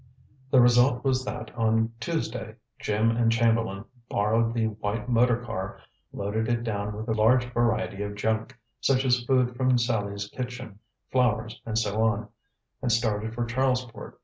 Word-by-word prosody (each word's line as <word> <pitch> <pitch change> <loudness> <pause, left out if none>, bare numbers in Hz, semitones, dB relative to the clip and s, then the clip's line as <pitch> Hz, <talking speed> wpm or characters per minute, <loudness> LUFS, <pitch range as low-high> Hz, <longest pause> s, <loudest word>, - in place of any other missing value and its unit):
The 130 - +5
result 125 +1 +5
was 130 -1 +1
that - - -6
on 110 0 +2
Tuesday 115 -7 -3 0.2
Jim 110 +2 +1
and 115 0 +2
Chamberlain 115 -3 +1 0.2
borrowed 115 +3 +2
the 115 -1 0
white 105 +1 -3
motor 120 0 +3
car, 95 -5 -5 0.3
loaded 110 +3 -2
it 120 -1 0
down 105 -2 -3
with 110 +2 -6
a 110 - +1
large 115 +3 +4
variety 115 -4 0
of 100 0 -4
junk, 110 +4 -2 0.2
such 135 -1 +2
as 125 -1 +2
food 125 -2 +2
from 130 0 +3
Sallie's 105 -4 -1
kitchen, 125 -3 -7 0.3
flowers 115 -3 +1
and 110 -1 -1
so 110 -1 0
on, 110 -1 +1 0.5
and 125 -2 0
started 110 -1 0
for 120 0 -1
Charlesport. 125 0 -2
115 Hz, 155 wpm, -27 LUFS, 110-125 Hz, 0.5 s, The